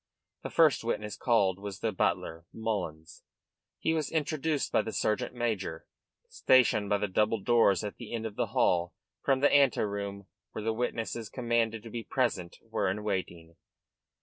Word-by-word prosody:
The - - -5
first 155 -8 +4
witness 105 -2 -2
called 100 -6 +2
was 100 -2 -6
the 110 - 0
butler, 85 -3 -1
Mullins. 100 -8 -4 0.6
He 160 - 0
was 155 -3 -1
introduced 155 -1 -1
by - - +3
the 110 - -5
sergeant 110 +3 -1
major 105 -9 -2 0.4
stationed 130 - +3
by 105 - +3
the 105 - -1
double 105 +3 +1
doors 110 -4 +3
at 105 - -5
the 120 - -9
end 115 -1 -3
of 110 -2 -5
the - - 0
hall 85 -1 +1 0.3
from 135 -1 +2
the 145 - +4
ante 140 -3 +5
room 100 -1 -3 0.3
where 110 - -5
the 110 +1 0
witnesses 115 -1 -3
commanded 115 -3 0
to 115 - -9
be 115 0 -4
present 110 -11 -1
were - - -1
in 105 +3 -3
waiting. 85 -5 -4
110 Hz, 170 wpm, -30 LUFS, 100-120 Hz, 0.6 s, ante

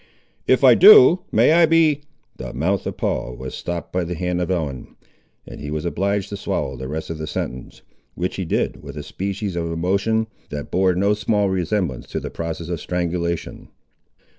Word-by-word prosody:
"If - - +3
I - - +9
do, 410 - +8
may - - +4
I 170 0 +6
b—!" 155 -3 +3 0.4
The - - -7
mouth 90 +9 0
of - - -5
Paul - - -2
was 65 +1 -7
stopped 85 -1 -5
by 90 0 0
the 85 +1 -4
hand 90 +1 -2
of 90 - -2
Ellen, 75 -8 -3 0.5
and - - -10
he 75 - -5
was 75 +1 -3
obliged 100 +3 -1
to 100 - -5
swallow 65 -7 -3
the 65 +1 -6
rest 80 +4 -5
of 80 - -6
the 80 - -4
sentence, 65 -4 -6 0.3
which 90 +1 -3
he 95 - -2
did 85 - -1
with - - -9
a - - -5
species 100 0 -4
of 85 -1 -2
emotion 100 +7 0 0.2
that 75 0 -6
bore 95 -1 +2
no 100 +3 +2
slight 105 0 0
resemblance 90 - -1
to - - -4
the - - -7
process 80 0 -5
of 85 -4 -3
strangulation. 85 -2 -3
90 Hz, 190 wpm, -21 LUFS, 80-100 Hz, 0.5 s, I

